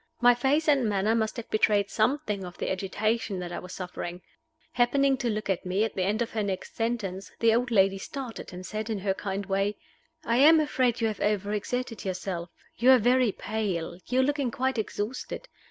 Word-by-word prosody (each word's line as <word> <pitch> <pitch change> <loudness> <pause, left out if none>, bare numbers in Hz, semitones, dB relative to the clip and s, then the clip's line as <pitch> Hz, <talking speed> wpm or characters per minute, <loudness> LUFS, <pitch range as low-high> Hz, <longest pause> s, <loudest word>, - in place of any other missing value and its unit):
My 245 0 +7
face 270 +6 +1
and 270 -7 +4
manner 205 +2 +1
must 220 +1 0
have 235 - -6
betrayed 205 -2 +2
something 220 -3 0
of 180 -1 -8
the - - -2
agitation 200 +2 -1
that 175 -1 -5
I - - -4
was 180 - -10
suffering. 180 -1 -6 0.5
Happening 270 +3 +3
to 245 -2 -1
look 215 -1 -2
at 190 -3 0
me 190 +3 0
at 225 - -1
the 190 - -2
end 210 +5 +1
of 230 - -7
her 220 - -1
next 195 -2 -4
sentence, 200 -6 -2
the 230 -1 +4
old 240 +2 +1
lady 195 -3 +3
started, 255 +1 -7
and 185 0 -8
said, 215 +3 -4
in 220 - -1
her 195 0 0
kindly 195 0 -4
way, 195 +2 0 0.5
"I 235 - +2
am 310 +4 +7
afraid 255 -6 +1
you 225 - +3
have 215 -2 -3
overexerted 210 +4 -1
yourself. 185 -2 -4 0.3
You 245 +3 +4
are 260 - +9
very 245 0 +3
pale 195 -5 -3
you 255 +1 +2
are - - +3
looking 285 -2 0
quite 260 +1 -1
exhausted. 220 - -4
215 Hz, 205 wpm, -27 LUFS, 195-245 Hz, 0.5 s, are